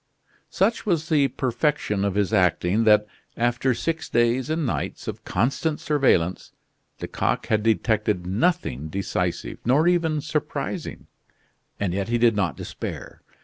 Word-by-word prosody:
Such 215 +4 +1
was 170 -6 0
the 145 -4 +4
perfection 125 -6 -1
of 100 -1 0
his 100 -3 0
acting 90 +3 +2
that, 105 -1 +5 0.3
after 120 +2 +1
six 165 +5 -3
days 120 +3 +2
and 160 0 0
nights 125 - -3
of - - -5
constant 140 - 0
surveillance, 125 - +1 0.5
Lecoq - - -1
had 110 -1 +1
detected 110 -3 +1
nothing 95 - 0
decisive, 95 +5 -3
nor 140 +8 +3
even 165 -3 +2
surprising. 150 +2 -4 0.7
And 95 -4 -1
yet 100 +1 -2
he 120 - +2
did 115 -2 +4
not 90 -9 0
despair. - - -7
120 Hz, 135 wpm, -24 LUFS, 100-150 Hz, 0.7 s, that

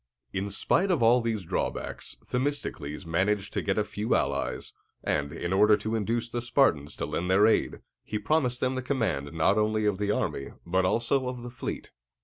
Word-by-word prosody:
In 95 +1 -2
spite 185 - +1
of 165 -10 +2
all 120 +2 +6
these 115 -4 -1
drawbacks, 85 - -3
Themistocles 125 - -3
managed 95 +4 0
to - - 0
get 95 0 -1
a 105 - +3
few 105 +1 -1
allies; - - -1 0.3
and, 70 -1 0
in 85 +4 -3
order 105 +2 +5
to 110 +1 -3
induce 115 +2 0
the 120 0 -3
Spartans 120 - +2
to - - -3
lend 90 +2 -2
their 95 +3 +5
aid, 110 - +2 0.2
he 105 - -3
promised 125 +2 +1
them 130 0 +1
the 130 - -2
command 115 - -1
not 85 +6 +2
only 110 0 +1
of 100 -2 +1
the 105 0 -1
army, 70 -9 -1
but 95 +2 +1
also 120 +6 +1
of 125 -1 -5
the 120 - -7
fleet. 120 - -5
105 Hz, 190 wpm, -28 LUFS, 95-120 Hz, 0.3 s, all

